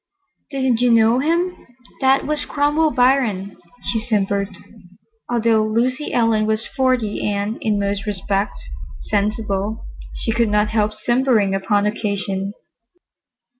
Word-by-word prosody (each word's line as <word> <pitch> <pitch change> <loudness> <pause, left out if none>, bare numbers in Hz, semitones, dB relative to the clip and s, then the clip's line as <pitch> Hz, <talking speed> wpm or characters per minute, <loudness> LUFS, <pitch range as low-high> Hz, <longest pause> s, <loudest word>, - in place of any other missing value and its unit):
"Didn't 260 -4 0
you 250 - +4
know 230 +1 +4
him? 340 +5 -1 0.3
That 265 0 +3
was 300 0 -1
Cromwell 295 +2 +2
Biron," 245 -8 +1 0.3
she 225 - -1
simpered. 200 -3 0 0.8
Although 230 -2 +2
Lucy 245 +6 0
Ellen 225 -3 +2
was 220 +1 -1
forty 255 -5 +1
and, 205 +2 -2
in 210 -2 0
most 200 0 -2
respects, 200 0 -1 0.5
sensible, 210 0 -1 0.3
she 225 - -1
could 235 -1 +1
not 210 0 +2
help 215 -1 0
simpering 235 -3 +2
upon 205 +1 +1
occasion. 200 -2 -2
220 Hz, 120 wpm, -20 LUFS, 205-250 Hz, 0.8 s, you